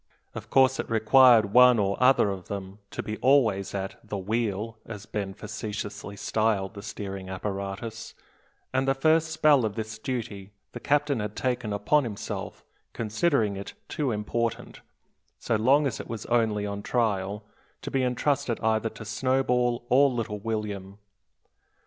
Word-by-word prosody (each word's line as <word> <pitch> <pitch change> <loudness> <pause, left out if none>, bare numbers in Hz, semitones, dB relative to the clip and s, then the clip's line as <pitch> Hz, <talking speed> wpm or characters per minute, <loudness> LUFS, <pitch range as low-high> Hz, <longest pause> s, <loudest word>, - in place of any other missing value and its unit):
Of - - -8
course 130 0 +4
it - - -3
required 115 -1 +5
one 125 -1 +7
or 100 -1 +1
other 125 -5 +5
of 95 -2 -7
them 100 0 -6
to - - -5
be 110 0 -4
always 115 -9 +2
at 95 0 -4
the 105 - -5
"wheel," 110 +2 -2
as 105 -2 -9
Ben 100 -3 -4
facetiously 105 -1 -6
styled 110 -1 0
the 100 - -8
steering 100 -2 -6
apparatus, 100 +4 -5 0.6
and 130 +1 +1
the 135 - +3
first 160 +3 +3
spell 155 -4 +4
of 105 -2 -2
this 110 -1 -5
duty 105 -5 -5 0.2
the - - -7
captain 145 -2 +1
had 105 0 -4
taken 125 -4 -2
upon 105 +9 +2
himself, 110 -5 -6 0.3
considering 110 -1 0
it 100 +1 -7
too 145 -3 -2
important, 115 +2 -3 0.6
so 115 - -1
long 135 +7 +4
as 135 - -2
it - - -7
was 115 -2 -5
only 110 -3 +1
on 100 0 -4
trial, 105 -3 -1 0.4
to - - -5
be 135 - +1
intrusted 125 -1 0
either 110 0 +1
to 110 - -11
Snowball 125 +1 0
or 140 +3 +5
little 115 -4 -3
William. 105 -3 -4
110 Hz, 155 wpm, -27 LUFS, 100-125 Hz, 0.6 s, one